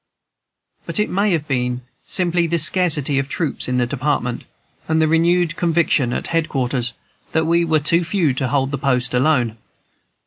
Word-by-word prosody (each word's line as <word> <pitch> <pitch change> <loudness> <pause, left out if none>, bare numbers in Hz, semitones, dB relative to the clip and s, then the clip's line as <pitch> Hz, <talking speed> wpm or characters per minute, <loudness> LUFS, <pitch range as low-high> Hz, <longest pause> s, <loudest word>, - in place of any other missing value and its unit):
But - - -2
it 210 - 0
may 200 +2 +1
have 155 -3 -1
been 125 -2 -1 0.3
simply 175 -2 +1
the 170 +1 0
scarcity 155 -4 +2
of 135 0 -3
troops 155 -2 -1
in 125 0 0
the 125 - +2
Department, 125 -1 -2 0.4
and 160 0 +1
the 160 - +3
renewed 170 +1 +2
conviction 165 -7 +1
at - - -3
head 165 -1 -1
quarters 125 -3 -1 0.4
that 160 0 +2
we 170 +1 +2
were 160 -2 +2
too 170 +4 +2
few 170 -5 +1
to 130 0 -2
hold 135 0 0
the 140 - -3
post 125 -3 0
alone. 125 -4 +1
155 Hz, 175 wpm, -20 LUFS, 130-170 Hz, 0.4 s, the